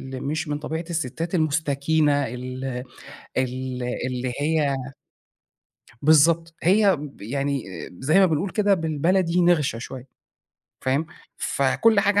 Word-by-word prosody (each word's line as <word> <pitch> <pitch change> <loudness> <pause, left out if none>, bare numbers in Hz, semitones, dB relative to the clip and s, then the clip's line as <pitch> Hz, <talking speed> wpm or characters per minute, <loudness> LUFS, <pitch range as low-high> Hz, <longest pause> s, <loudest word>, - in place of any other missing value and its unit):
ال - - -6
مش 155 +3 -2
من 145 0 -2
طبيعة 160 +2 -4
الستات 165 +2 -2
المُستكينة 150 -2 +1
ال 130 +2 -6 0.7
ال 130 0 -2 0.2
اللي 125 0 -3
هي 150 -2 +1 1.3
بالضبط، 165 +2 +4
هي 195 +2 +5
ب 145 -5 -10
يعني 140 +3 -2 0.4
زي 155 +8 +3
ما 195 - +7
بنقول 170 +3 0
كده 205 -2 +3
بالبلدي 170 +2 +1
نِغْشة 160 -9 +2
شوية 130 +2 -8 0.7
فاهم؟ 135 +5 0 0.3
فكل 200 +10 +2
حاجة 205 0 +3
150 Hz, 120 wpm, -24 LUFS, 135-170 Hz, 1.3 s, ما